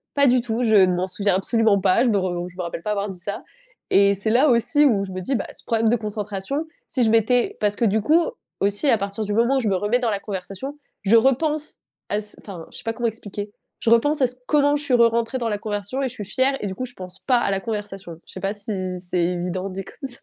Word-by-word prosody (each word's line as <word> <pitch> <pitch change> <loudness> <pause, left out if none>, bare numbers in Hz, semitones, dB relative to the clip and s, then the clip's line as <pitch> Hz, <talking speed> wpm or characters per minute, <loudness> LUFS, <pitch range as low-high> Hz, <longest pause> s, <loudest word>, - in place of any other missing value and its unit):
pas 280 0 +4
du 250 0 +4
tout. 235 0 -2
Je 220 -2 +3
ne 185 -2 +6
m'en 180 +1 -1
souviens 200 0 +1
absolument 215 +1 +2
pas, 190 +5 +3
je - - +2
me 210 - +2
re 175 -1 -2
je 180 - -19
me - - -3
rappelle 170 -1 -5
pas 210 - -1
avoir 205 0 -1
dit 185 -2 -8
ça 200 +3 -5 0.5
et 200 0 +5
c'est 200 +3 -2
là 255 +6 +5
aussi 255 +5 +4
où 215 -8 +3
je 190 - -9
me 185 - -4
dis: 265 +9 -1
«Bah, 205 - -2
ce - - -12
problème 225 -1 +2
de 235 - +4
concentration, 210 +6 -4 0.2
si 255 - 0
je 225 - +3
m'étais» 230 +2 +2
parce 205 -1 +2
que - - -2
du 215 +1 +2
coup, 320 +10 +3 0.4
aussi, 205 +8 +1
à 230 - +5
partir 200 +2 -3
du 205 - -2
moment 235 +5 +3
où - - +3
je 225 - -1
me 195 - +2
remets 205 +6 +1
dans 245 -2 0
la 200 - -1
conversation, 200 +8 -6 0.3
je 210 +3 +4
repense 295 +5 +1 0.3
à 210 - 0
ce 210 0 -10
enfin 180 -5 -9
je - - -10
sais - - -14
pas 225 -1 -2
comment 240 0 -1
expliquer. 205 -2 -6 0.3
Je - - 0
repense 285 +6 +3
à 260 - +5
c 250 - -5
comment 290 -1 +3
je 295 - -2
suis 280 - -1
re 235 -1 +6
rentrée 230 +2 -1
dans 235 - -1
la 210 - -1
conversion 205 +5 -3
et - - +1
je - - -10
suis 210 -5 -7
fière 260 +7 +1
et 205 - -2
du 190 - -5
coup 255 - -4
je 245 - -10
pense 185 -3 -10
pas 255 -2 +3
à 235 - 0
la 195 0 -1
conversation. 195 -6 -6
Je - - -12
sais - - -7
pas 195 +1 0
si 210 +1 -4 0.3
c'est 180 0 -2
évident 180 +2 -2
dit 190 0 -6
comme 270 +6 -8
ça? 245 - -8
210 Hz, 280 wpm, -23 LUFS, 195-245 Hz, 0.5 s, ne